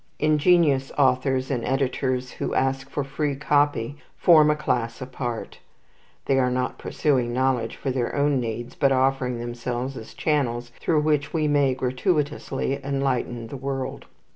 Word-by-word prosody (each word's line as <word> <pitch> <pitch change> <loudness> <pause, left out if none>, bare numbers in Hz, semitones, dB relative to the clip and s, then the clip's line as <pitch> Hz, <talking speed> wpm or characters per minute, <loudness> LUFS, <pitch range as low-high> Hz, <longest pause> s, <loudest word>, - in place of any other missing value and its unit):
Ingenious 155 -3 +3
authors 130 0 +2
and 125 -3 -1
editors 130 -1 -1
who - - -4
ask 135 +1 0
for 145 - -2
free 140 +1 -2
copy 145 -2 +1 0.2
form 155 -3 +6
a 150 - +3
class 120 -6 -1
apart. 125 -2 -5 0.7
They 135 -1 +2
are 125 -1 +2
not 125 0 -2
pursuing 125 -5 0
knowledge 130 -3 0
for 135 - -3
their 125 -2 -2
own 145 -1 +2
needs, 120 +1 -4
but 140 -2 +2
offering 130 -1 +1
themselves 120 +2 -4
as 110 - -10
channels 120 -6 -1
through 155 -3 +2
which 150 -2 0
we 155 -2 +1
may 140 -3 +3
gratuitously 140 0 -1
enlighten 135 -4 -1
the 140 - -6
world. 135 0 -4
135 Hz, 145 wpm, -24 LUFS, 125-145 Hz, 0.7 s, form